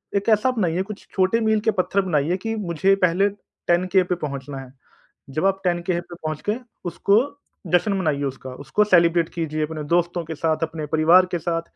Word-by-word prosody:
एक 200 +2 +1
ऐसा 220 +3 +4
बनाइए 185 -7 0
कुछ 210 +1 -10
छोटे 190 +4 +2
मील 220 -1 +2
के - - +6
पत्थर 200 0 +1
बनाइए 165 0 +1
कि 225 +4 -3
मुझे 195 -1 +1
पहले 180 +3 +3
10 185 -3 -2
के - - -8
के - - +4
पे 180 0 -1
पहुँचना 140 -3 -6
है। 130 -1 -11 0.6
जब 155 +7 0
आप 195 0 +1
10 175 -1 +1
के 175 0 -1
पे 175 - -12
पहुँच 155 -2 -5
गए 215 +4 0 0.2
उसको 180 +3 +1 0.6
जश्न 190 +4 +3
मनाइए 155 -7 0
उसका, 130 -1 -5
उसको 150 +10 0
सेलिब्रेट 170 -4 +4
कीजिए 155 -2 -2
अपने 155 0 -6
दोस्तों 175 0 0
के 160 0 -6
साथ, 160 +1 -1
अपने 160 -1 -3
परिवार 165 +5 +5
के 175 - 0
साथ 165 +1 -2
175 Hz, 205 wpm, -22 LUFS, 155-195 Hz, 0.6 s, के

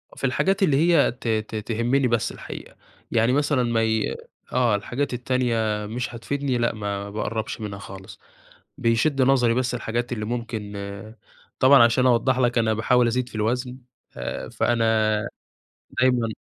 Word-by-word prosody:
في - - -13
الحاجات 190 +10 +1
اللي 145 -7 +3
هي 170 -2 +4
ت 125 -1 -9
ت 110 0 -1
تهمني 120 +5 0
بس 115 -2 0
الحقيقة، - - -9 0.4
يعني 115 +2 +3
مثلًا 145 -3 +2
ما 115 -1 +1
ي 110 -1 0 0.4
آه 120 -4 +3
الحاجات 125 +7 -3
التانية 115 -4 0
مش 120 +2 -4
هتفيدني 135 +2 -2
لأ 120 -1 +1
ما 100 -1 -4
باقرّبش 110 +1 -4
منها 100 -2 -5
خالص، 95 -1 -11 0.6
بيشد 130 +5 +1
نظري 125 -3 +4
بس 125 0 0
الحاجات 120 +1 -3
اللي 110 -2 -4
ممكن، 115 -3 -4 0.9
طبعًا 130 -2 +7
عشان 120 +2 +3
أوضّح 125 +1 +3
لك 120 -1 +2
أنا 110 -1 +2
باحاول 120 +3 +3
أزيد 125 +1 -1
في - - -13
الوزن، 125 +4 -1 0.4
آآ - - -5
فأنا 120 -1 0 1.2
دايمًا 125 -2 +3
120 Hz, 150 wpm, -24 LUFS, 110-130 Hz, 1.2 s, طبعًا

